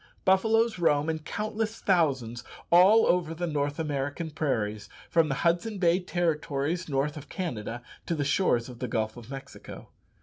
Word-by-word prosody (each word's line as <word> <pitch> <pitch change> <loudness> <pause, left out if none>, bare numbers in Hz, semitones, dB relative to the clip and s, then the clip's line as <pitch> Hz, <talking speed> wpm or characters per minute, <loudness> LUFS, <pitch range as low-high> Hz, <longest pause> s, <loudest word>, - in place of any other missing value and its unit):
Buffaloes 220 +3 +3
roam 150 -2 +2
in 160 - -4
countless 215 +6 -3
thousands 135 - +1 0.3
all 190 +6 +7
over 170 -2 +1
the 175 +2 -2
North 145 -3 -1
American 145 +1 -3
prairies, 110 -9 -2 0.2
from 165 -2 +3
the 135 - 0
Hudson 175 +6 +1
Bay 175 -1 +3
Territories, 165 -2 -1
north 145 +2 -1
of 145 -1 -10
Canada, 120 - -4 0.2
to 170 - 0
the 145 -2 -1
shores 135 -6 +2
of 125 -2 -10
the 125 - -3
Gulf 110 -1 -2
of 120 -1 -11
Mexico. 135 -1 -9
155 Hz, 160 wpm, -28 LUFS, 135-180 Hz, 0.3 s, all